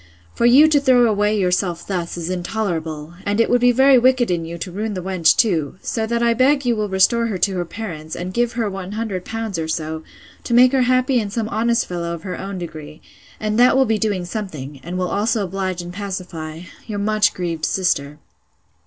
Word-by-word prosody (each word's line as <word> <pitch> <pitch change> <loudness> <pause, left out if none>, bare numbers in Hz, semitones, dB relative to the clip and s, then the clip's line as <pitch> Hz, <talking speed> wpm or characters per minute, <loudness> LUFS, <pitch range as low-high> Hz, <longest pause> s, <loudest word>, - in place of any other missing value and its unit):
for 235 - +2
you 275 +6 +7
to 305 -2 +4
throw 255 -3 +4
away 210 -1 +1
yourself 180 -2 0
thus, 175 -3 -3
is 170 -1 -4
intolerable; 170 -5 -3
and 205 +2 -1
it 230 - +2
would 245 0 +3
be 245 0 +5
very 265 +1 +5
wicked 250 -3 +3
in 170 -2 -1
you 170 +1 -6
to 175 +2 -6
ruin 210 +3 -3
the 185 - -4
wench 180 -4 +3
too. 165 - +1
So 220 -1 -2
that 235 +1 0
I 235 0 +3
beg 270 +3 +2
you 240 -1 +2
will 210 -1 -2
restore 230 +5 +3
her 210 -4 -2
to 190 +2 0
her 175 - -1
parents, 165 -5 -7
and 180 +1 -5
give 240 +2 0
her 230 -2 -1
100L. 200 +1 -4
or - - -5
so, 160 0 -3 0.4
to - - -3
make 250 +1 +7
her 265 -1 +2
happy 255 0 +2
in 210 -3 -3
some 220 +1 -2
honest 235 +1 +1
fellow 170 -1 -4
of 165 - -12
her 185 - -4
own 195 0 -5
degree; 155 -3 -8 0.4
and 215 +1 -1
that 250 +2 +5
will 265 - +4
be 220 -2 0
doing 205 -5 -1
something, 155 -8 -6
and 175 +5 -5
will 180 0 -1
also 215 +1 0
oblige 185 -1 -3
and 175 0 -8
pacify 180 -5 -6 0.3
'Your 210 -2 -4
much 215 +1 +2
grieved 165 -3 -2
sister. 150 -5 -1
200 Hz, 215 wpm, -20 LUFS, 175-230 Hz, 0.4 s, you